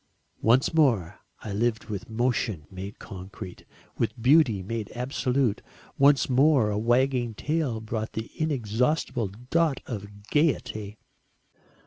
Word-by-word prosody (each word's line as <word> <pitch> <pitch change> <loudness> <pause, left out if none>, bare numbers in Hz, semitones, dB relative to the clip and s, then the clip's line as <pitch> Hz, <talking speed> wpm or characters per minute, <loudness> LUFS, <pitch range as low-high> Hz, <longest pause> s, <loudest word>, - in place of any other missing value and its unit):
Once 125 +7 +3
more 120 - +2 0.2
I 105 - -5
lived 110 +2 0
with 110 +3 -6
motion 110 -7 -1
made 95 +2 -7
concrete, 95 0 -9 0.3
with 115 +1 -1
beauty 125 - +4
made 110 +1 -4
absolute 125 -2 0 0.3
once 140 0 +5
more 130 -4 +4
a 105 - -1
wagging 120 0 +1
tail 150 -4 -1
brought 110 0 -4
the 110 0 -5
inexhaustible 125 -4 0
dot 130 - 0
of 105 -3 -7
gaiety. 110 -9 0
115 Hz, 115 wpm, -27 LUFS, 105-135 Hz, 0.3 s, once